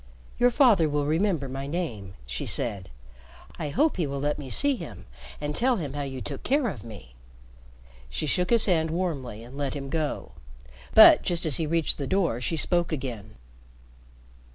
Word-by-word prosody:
"Your 245 - +5
father 230 - +4
will 145 0 0
remember 160 -1 0
my 135 +1 -5
name," 115 - -4
she - - -5
said. 100 -6 -1 0.7
"I 150 - -3
hope 295 - +1
he 170 -5 0
will 140 0 -4
let 145 +2 -1
me 135 -3 -7
see 285 - +2
him - - -9 0.3
and 150 0 -3
tell 255 +1 +2
him 150 - -4
how 145 - -4
you 135 -2 -5
took 140 +1 -6
care 275 -3 +1
of 125 - -8
me." 100 - -12 1.0
She - - -3
shook 180 +4 0
his 235 -2 +4
hand 165 -4 +1
warmly 145 - -3
and 125 +3 -12
let 140 -1 -3
him 135 -1 -6
go. 155 -2 -3 0.6
But - - +9
just 170 -1 +1
as 150 -4 +2
he 160 - -1
reached 165 -1 0
the 140 - -3
door 175 -11 0
she 165 +6 -1
spoke 175 +1 +2
again. 120 -8 -5
150 Hz, 180 wpm, -26 LUFS, 130-175 Hz, 1.0 s, But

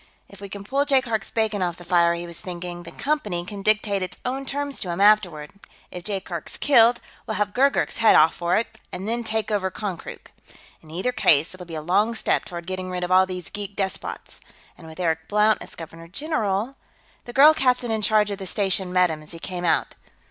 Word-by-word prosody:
If 200 - -15
we 200 - -7
can 200 +1 -7
pull 275 +7 +1
Jaikark's 255 -7 +1
bacon 220 -3 0
off 175 -1 -1
the 175 - -12
fire, 170 -1 +3
he 170 0 -5
was 170 -1 -7
thinking, 175 -1 -6
the 170 -1 -10
Company 210 - -2
can 200 +1 -7
dictate 210 -1 +1
its 185 -1 -5
own 265 +2 -3
terms 285 0 -2
to 180 - -4
him 170 +2 -3
afterward; 195 -8 +3 0.4
if 180 - -8
Jaikark's 190 -4 -4
killed, 240 -4 +5 0.3
we'll 220 - -2
have 205 0 -1
Gurgurk's 275 +2 +2
head 225 -1 +6
off 155 +1 +6
for 170 0 0
it, 220 0 -3
and 190 +3 -6
then 235 +1 -1
take 220 -1 -1
over 195 -3 0
Konkrook. 185 -2 -7 0.5
In 155 - -18
either 185 +10 -1
case, 160 -9 +3
it'll 180 -1 -10
be 165 - -7
a 155 - -5
long 205 +7 +2
step - - 0
toward 170 -2 -7
getting 185 0 -4
rid 180 -1 -3
of 180 - -3
all 185 +1 +5
these 180 -2 -6
geek 205 -1 -6
despots. 195 -2 -4 0.3
And 165 - -14
with 160 +2 -12
Eric 160 -2 -1
Blount 210 +1 +3
as - - -9
Governor 165 0 -10
General.... 225 - -2 0.5
The 240 - -9
girl 295 +4 +8
captain 250 -5 +1
in 220 -1 0
charge 210 0 +3
of 200 - -4
the 190 - -6
station 190 -1 0
met 180 -2 +3
him 155 -1 -6
as 155 - -9
he - - -7
came 180 +1 -5
out. 165 - +1
195 Hz, 220 wpm, -24 LUFS, 175-220 Hz, 0.5 s, girl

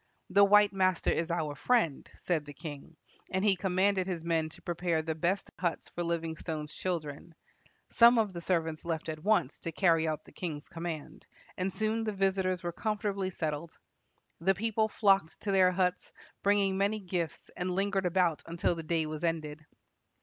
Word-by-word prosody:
"The 200 - +6
white 205 0 +6
master 185 -2 +2
is 165 0 -1
our 160 -3 -1
friend," 170 - +1
said 160 -4 -1
the 145 0 -10
king, 155 0 -9 0.3
and 190 +2 0
he 200 -2 +5
commanded 190 +1 +1
his 175 -4 -3
men 165 -2 0
to - - -15
prepare 170 -2 -1
the 160 0 -2
best 175 +5 -1
huts 175 -2 -2
for 175 - -5
Livingstone's 160 -2 -3
children. 165 -2 -4 0.6
Some 235 +1 +7
of 215 -4 +1
the 170 - -6
servants 165 -3 -1
left 165 -1 -3
at 155 0 -5
once 210 -10 +2
to 165 - -4
carry 165 -2 +3
out 155 -1 -3
the - - -15
king's 155 -4 -5
command, 165 -2 -6 0.3
and 185 +1 -1
soon 220 +3 -1
the 215 -1 -2
visitors 190 -2 0
were 175 - -2
comfortably 200 0 -2
settled. 160 -2 -4 0.6
The 190 +4 +2
people 220 +1 +1
flocked 195 -6 +2
to 205 - -1
their 190 -1 +5
huts, 180 0 -1 0.3
bringing 200 -1 +2
many 205 +2 +1
gifts, 175 -4 -4
and 180 +1 -2
lingered 195 -1 +1
about 175 -3 +2
until 170 +1 0
the 165 - -5
day 160 0 0
was 155 0 -5
ended. 155 -2 -2
175 Hz, 175 wpm, -31 LUFS, 160-195 Hz, 0.6 s, Some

